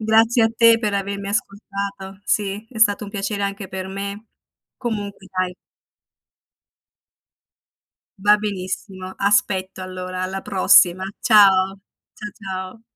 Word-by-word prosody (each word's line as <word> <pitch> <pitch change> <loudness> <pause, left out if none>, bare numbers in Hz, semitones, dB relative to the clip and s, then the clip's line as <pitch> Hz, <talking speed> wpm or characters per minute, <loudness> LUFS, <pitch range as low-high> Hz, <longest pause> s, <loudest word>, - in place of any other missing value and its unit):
Grazie 225 +2 +4
a 225 - +4
te 230 -1 +6
per 210 -3 -1
avermi 200 0 -3
ascoltato. 200 -2 -4
Sì, 205 +1 -1
è 225 - -8
stato 210 -1 +3
un 200 - -9
piacere 200 0 -3
anche 200 -1 -3
per 190 0 -5
me. 200 +3 -6 0.5
Comunque 205 -5 -5
dai 185 -1 0 2.7
Va 205 +1 +5
benissimo. 190 -2 -5
Aspetto 190 -2 +1
allora, 185 0 -5
alla 190 +1 -3
prossima. 185 -1 +4 0.2
Ciao, 195 -5 +5 0.4
cia 210 - -7
ciao. 190 +1 -7
200 Hz, 115 wpm, -21 LUFS, 190-210 Hz, 2.7 s, te